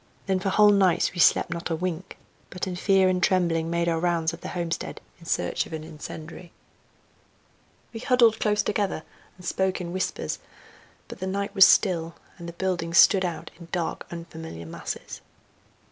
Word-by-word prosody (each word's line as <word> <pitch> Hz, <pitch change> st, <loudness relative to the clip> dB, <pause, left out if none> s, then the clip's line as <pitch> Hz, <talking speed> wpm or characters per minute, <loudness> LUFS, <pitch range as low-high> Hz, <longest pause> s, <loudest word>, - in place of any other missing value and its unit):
Then 190 Hz, -1 st, +1 dB
for 195 Hz, -, -1 dB
whole 210 Hz, +2 st, +6 dB
nights 195 Hz, -4 st, +3 dB
we 175 Hz, -, -7 dB
slept 175 Hz, -, +4 dB
not 170 Hz, 0 st, -4 dB
a 165 Hz, -, 0 dB
wink, 180 Hz, +1 st, -4 dB, 0.3 s
but 180 Hz, -, -4 dB
in 185 Hz, -1 st, -4 dB
fear 190 Hz, +1 st, +3 dB
and 185 Hz, -1 st, +1 dB
trembling 170 Hz, -3 st, +2 dB
made 170 Hz, 0 st, 0 dB
our 165 Hz, -1 st, +1 dB
rounds 170 Hz, -1 st, 0 dB
of 165 Hz, -, -9 dB
the -, -, -6 dB
homestead 170 Hz, -2 st, -4 dB, 0.2 s
in 165 Hz, -, -15 dB
search -, -, -1 dB
of -, -, -11 dB
an 155 Hz, -1 st, -5 dB
incendiary. 160 Hz, +3 st, -9 dB, 1.4 s
We 225 Hz, -, -6 dB
huddled 235 Hz, -2 st, +4 dB
close 210 Hz, -1 st, +1 dB
together 205 Hz, -6 st, -1 dB, 0.3 s
and 180 Hz, -, -13 dB
spoke 190 Hz, +1 st, 0 dB
in 175 Hz, -1 st, -5 dB
whispers; 185 Hz, -, -3 dB, 0.7 s
but -, -, -10 dB
the 190 Hz, -, -3 dB
night 200 Hz, +1 st, -2 dB
was 195 Hz, -2 st, +8 dB
still, 170 Hz, -4 st, +2 dB, 0.2 s
and 170 Hz, 0 st, -7 dB
the -, -, -9 dB
buildings 175 Hz, -2 st, -1 dB
stood 195 Hz, -1 st, +7 dB
out 175 Hz, -3 st, -4 dB
in 170 Hz, -, -11 dB
dark, 170 Hz, -2 st, -3 dB
unfamiliar 160 Hz, -, -8 dB
masses. 80 Hz, -, -7 dB
175 Hz, 175 wpm, -25 LUFS, 165-190 Hz, 1.4 s, was